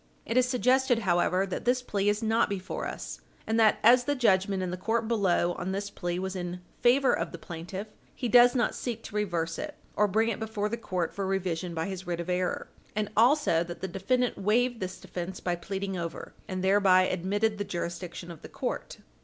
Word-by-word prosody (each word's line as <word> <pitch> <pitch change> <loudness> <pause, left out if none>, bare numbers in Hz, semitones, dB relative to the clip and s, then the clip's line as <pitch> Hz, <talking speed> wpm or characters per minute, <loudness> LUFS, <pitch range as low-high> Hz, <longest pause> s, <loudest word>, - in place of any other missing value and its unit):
It 230 - -3
is 250 0 +4
suggested, 255 0 +3
however, 185 -2 +2
that 190 - -4
this 250 +1 +2
plea 205 -4 0
is 210 +2 0
not 225 +1 +2
before 190 -2 -4
us, - - -6 0.2
and 220 +1 +1
that, 220 -1 +5
as 245 +2 +6
the 290 - +1
judgment 195 -5 +2
in 180 - -2
the - - -2
court 225 +5 -1
below 190 -6 +2
on 180 +2 -4
this 200 +1 -3
plea 175 -1 -3
was 190 +1 -3
in 175 -1 -4 0.2
favor 255 +1 +5
of 165 0 -1
the - - -7
plaintiff, 175 +4 -6 0.3
he 250 - -2
does 245 +1 +7
not 240 - +2
seek 230 -2 -4
to 210 - -9
reverse 170 -6 -1
it, 300 -1 -5 0.2
or 210 - +4
bring 220 +4 +2
it 225 - -3
before 220 -1 -2
the 230 - -1
court 185 -7 -3
for 195 -1 -3
revision 180 -2 -2
by 160 0 -1
his 190 -1 -6
writ 175 -1 -2
of 170 +1 -3
error, 180 0 -1 0.3
and 210 -1 -1
also 240 - +4
that 175 0 -8
the 190 - -2
defendant 245 +7 0
waived 235 +4 +2
this 185 0 -5
defence 180 +1 -6
by 175 -1 -1
pleading 195 +2 -4
over, 170 -2 -5
and 185 -1 -3
thereby 190 -1 +5
admitted 205 +4 0
the - - 0
jurisdiction 175 -1 -5
of 165 - -11
the - - -10
court. - - -4
195 Hz, 210 wpm, -28 LUFS, 180-225 Hz, 0.3 s, does